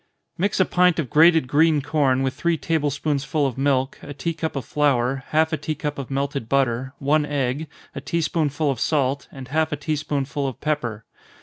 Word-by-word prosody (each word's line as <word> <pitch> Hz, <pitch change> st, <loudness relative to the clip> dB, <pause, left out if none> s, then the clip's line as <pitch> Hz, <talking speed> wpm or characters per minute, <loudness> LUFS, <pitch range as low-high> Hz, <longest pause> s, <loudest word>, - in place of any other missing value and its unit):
_ -, -, -43 dB, 0.3 s
Mix 195 Hz, +3 st, 0 dB
a 185 Hz, -, +5 dB
pint 180 Hz, -1 st, +3 dB
of 150 Hz, -8 st, -2 dB
grated 160 Hz, -2 st, +5 dB
green 155 Hz, +3 st, +4 dB
corn 140 Hz, -3 st, +1 dB
with 130 Hz, -1 st, 0 dB
three 170 Hz, -1 st, 0 dB
table 155 Hz, -2 st, 0 dB
spoonsful 145 Hz, +1 st, -1 dB
of 130 Hz, -4 st, -1 dB
milk, 135 Hz, 0 st, 0 dB
a 145 Hz, -, -8 dB
tea 165 Hz, +4 st, -2 dB
cup 160 Hz, -1 st, -4 dB
of 135 Hz, -4 st, -3 dB
flour, 135 Hz, -2 st, +1 dB
half 160 Hz, +1 st, +2 dB
a -, -, +1 dB
tea 155 Hz, +1 st, -3 dB
cup 145 Hz, 0 st, -4 dB
of 135 Hz, -, -6 dB
melted 140 Hz, -3 st, -2 dB
butter, 130 Hz, 0 st, 0 dB
one 150 Hz, +2 st, +2 dB
egg, 145 Hz, +1 st, -2 dB, 0.3 s
a -, -, -6 dB
tea 170 Hz, -, -1 dB
spoonful 150 Hz, -2 st, 0 dB
of 130 Hz, -, -4 dB
salt, 140 Hz, -1 st, 0 dB
and 130 Hz, -2 st, -10 dB
half 155 Hz, +2 st, +1 dB
a -, -, 0 dB
tea 150 Hz, +1 st, -2 dB
spoonful 145 Hz, -1 st, -2 dB
of 130 Hz, -, -6 dB
pepper. 120 Hz, -9 st, -2 dB
145 Hz, 210 wpm, -23 LUFS, 135-155 Hz, 0.3 s, a